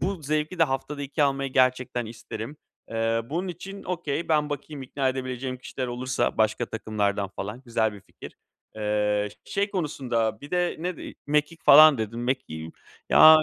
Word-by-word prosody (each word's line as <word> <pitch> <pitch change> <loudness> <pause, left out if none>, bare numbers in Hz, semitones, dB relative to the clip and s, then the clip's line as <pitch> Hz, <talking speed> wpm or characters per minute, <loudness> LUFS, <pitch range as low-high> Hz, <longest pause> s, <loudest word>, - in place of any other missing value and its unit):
bu 185 -2 -2
zevki 155 +4 -1
de 165 - +6
haftada 140 +1 -3
2 145 +2 -1
almayı 135 -1 +1
gerçekten 125 -2 +2
isterim. 115 +4 -7 0.3
Iıı, 115 +1 0
bunun 180 +4 -2
için 195 +3 -7
okay 170 -3 -2
ben 150 -2 +2
bakayım 145 0 -5
ikna 135 +1 -1
edebileceğim 130 0 -3
kişiler 130 0 -5
olursa 125 0 -1
başka 110 +2 +2
takımlardan 105 -3 -1
falan, 105 +6 -6
güzel 115 -3 +1
bir 100 - -11
fikir. - - -13 0.4
Eee, 105 -1 +1 0.2
ş - - -11
şey 200 +1 +1
konusunda 120 - -1
bir 145 - -10
de 180 -1 +1
ne 175 +1 -3
dedik? - - -9
Mekik 150 +3 0
falan 155 -2 +9
dedin. 110 +1 -3
Mekiği 80 -11 -3 0.4
ya, 155 0 +10
ııı, 155 - +3
130 Hz, 170 wpm, -26 LUFS, 115-155 Hz, 0.4 s, ya